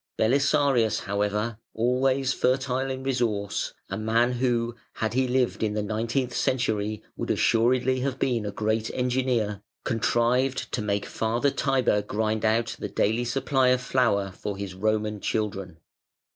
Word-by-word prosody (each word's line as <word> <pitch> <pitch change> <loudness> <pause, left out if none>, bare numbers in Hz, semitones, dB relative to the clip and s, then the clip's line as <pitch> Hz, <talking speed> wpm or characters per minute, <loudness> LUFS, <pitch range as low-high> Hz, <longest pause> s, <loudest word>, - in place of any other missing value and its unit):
Belisarius, 130 -2 +2
however, 105 +3 -1 0.2
always 130 +3 +2
fertile 130 0 0
in 130 0 -4
resource, 115 -6 -1
a 95 - -4
man 115 +3 +2
who, 120 -2 0 0.2
had 110 0 -2
he 130 +1 +2
lived 125 0 0
in 105 -1 0
the 105 - 0
nineteenth 115 +4 -1
century, 110 -5 0
would - - -4
assuredly 125 +3 +2
have 130 0 -2
been 120 -5 0
a 105 - -3
great 110 +2 -1
engineer, 125 -5 0 0.2
contrived 125 +2 +1
to - - -1
make 100 -1 -1
Father 120 +5 0
Tiber 130 -7 +1
grind 110 +1 -1
out 115 +1 +1
the - - -4
daily 115 +4 +1
supply 130 +1 +1
of 125 0 +4
flour 110 -7 +1
for 100 +1 -5
his 100 -2 -5
Roman 105 +2 -1
children. 100 -6 -2
115 Hz, 145 wpm, -26 LUFS, 105-130 Hz, 0.2 s, of